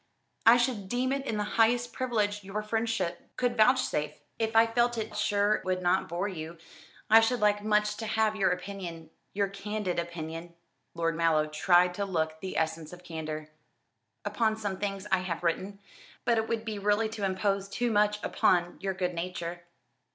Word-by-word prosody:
I 235 +1 +9
should 240 -6 -1
deem 255 +2 0
it 275 0 -2
the 210 -1 -1
highest 235 +3 +2
privilege 210 -5 -1
your 200 +2 -4
friendship 215 -5 -2
could 245 -1 +1
vouchsafe." 220 - +3 0.3
"If 225 0 -1
I 225 0 +7
felt 240 +1 +1 0.2
sure 205 0 +2
it - - -2
would 185 0 -1
not 180 +2 +2
bore 175 +4 -1
you, 170 -3 -6 0.5
I 220 +1 +8
should 235 +2 +1
like 205 -1 +2
much 210 0 +2
to 220 - -4
have 215 0 +1
your 195 -3 +2
opinion, 180 -3 -5 0.2
your 200 0 +2
candid 200 -2 -3
opinion," 170 0 -6 0.4
(Lord 165 -1 0
Mallow 165 -2 +3
tried 175 +4 +3
to 200 +2 -2
look 160 -4 -1
the 190 +1 -6
essense 160 -1 -1
of 180 0 -12
candour) 155 -2 -5 0.8
"upon 220 +1 +1
some 205 -3 -3
things 195 -1 -3
I 190 - +4
have 180 -2 -4
written. 185 +4 -1 0.5
But 235 -2 +3
it 220 - -2
would 225 -1 -2
be 215 -2 -4
really 210 +2 +2
to 220 -2 -6
impose 195 +1 0
too 240 +4 -1
much 210 0 +3
upon 175 -1 +2
your 195 -1 -2
good 180 -1 -1
nature." 175 0 -5
200 Hz, 175 wpm, -29 LUFS, 175-220 Hz, 0.8 s, I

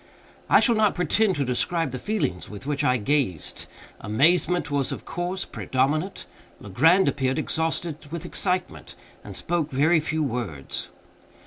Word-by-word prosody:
I - - +7
shall 235 - +4
not 215 -2 +2
pretend 185 +4 +2
to 140 -2 0
describe 160 +5 0
the 130 - -5
feelings 200 - -2
with 105 +4 -9
which 145 0 -1
I 125 0 +3
gazed. 120 - -1 0.3
Amazement 165 - +2
was, 140 -2 0
of - - -6
course, 175 +3 -3
predominant. 150 +8 -1 0.3
Legrand 160 - +3
appeared 130 -1 0
exhausted 160 -1 -2
with 170 -1 -5
excitement, 180 -1 -2 0.3
and 100 - -8
spoke 165 - -1
very 155 +5 +3
few 155 +1 -1
words. 115 - -3
150 Hz, 140 wpm, -25 LUFS, 130-175 Hz, 0.3 s, I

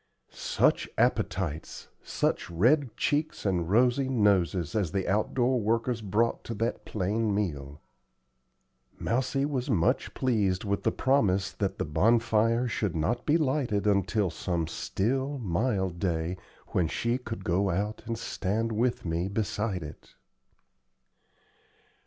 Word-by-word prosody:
Such - - +1
appetites, 80 -3 -1
such - - -1
red 120 - +2
cheeks 150 -3 -1
and 90 -4 0
rosy 125 +5 +3
noses 95 - +2
as 100 -7 0
the 95 -2 -1
outdoor 120 +5 +1
workers 115 +2 0
brought 110 +3 0
to 115 - -4
that 115 +3 -2
plain 105 +2 -1
meal! 75 -8 -3 1.2
Mousie 130 +3 0
was 140 -2 -2
much 90 -9 +1
pleased 105 -8 +1
with 100 -1 -1
the - - +1
promise 105 -8 +2
that - - -2
the - - -1
bonfire 115 +6 +2
should 105 -6 -2
not 115 +11 -1
be 155 +2 +5
lighted 130 - 0
until 100 -1 +2
some 85 -3 -2
still, 130 - -2
mild 95 -4 -1
day 85 -1 -1 0.3
when 90 -3 +1
she 120 +9 -1
could 115 -2 -6
go 95 +3 +1
out 100 +4 -2
and 115 -1 -2
stand 110 +1 -2
with 120 +1 0
me 85 +2 -1
beside 100 -2 -2
it. 75 - -11
105 Hz, 130 wpm, -28 LUFS, 95-120 Hz, 1.2 s, be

